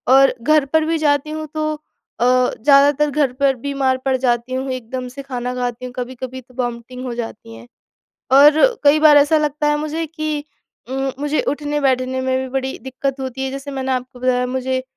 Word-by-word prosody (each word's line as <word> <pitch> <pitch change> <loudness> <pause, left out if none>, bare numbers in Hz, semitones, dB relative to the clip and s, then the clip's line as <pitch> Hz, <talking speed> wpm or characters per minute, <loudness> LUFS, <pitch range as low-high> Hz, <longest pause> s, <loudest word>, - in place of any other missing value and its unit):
और 270 0 +6
घर 305 +2 +3
पर 315 -1 +3
भी 330 0 0
जाती 295 -1 +1
हूँ 310 0 -5
तो 310 0 -1
अ, 300 -5 -10
ज़्यादातर 275 +4 +3
घर 285 -4 +1
पर 270 0 +2
बीमार 270 0 -1
पड़ 265 - +2
जाती 245 0 0
हूँ, 260 +1 -2
एकदम 255 0 -5
से 275 +2 -9
खाना 250 -2 -4
खाती 245 0 -3
हूँ 250 - -8
कभी-कभी 255 +1 -6
तो 250 +1 -23
वॉमिटिंग 245 +1 -6
हो 245 - -4
जाती 225 - -7
हैं 115 +1 -13 0.7
और 295 +2 +7 0.2
कई 290 +2 +6
बार 300 -1 +7
ऐसा 295 +2 +4
लगता 300 0 0
है 295 - +2
मुझे 310 +2 -3
कि 310 -1 -4 0.5
उम, 270 0 -2
मुझे 295 +1 0
उठने 295 +1 -2
बैठने 260 -1 0
में 260 0 0
भी 260 0 -4
बड़ी 265 0 -5
दिक्कत 265 +1 -4
होती 265 0 -4
है 265 - -2
जैसे 275 +1 -6
मैंने 265 -1 -2
आपको 255 0 -4
बताया 250 0 +1
मुझे 260 0 -2
265 Hz, 195 wpm, -19 LUFS, 255-290 Hz, 0.7 s, और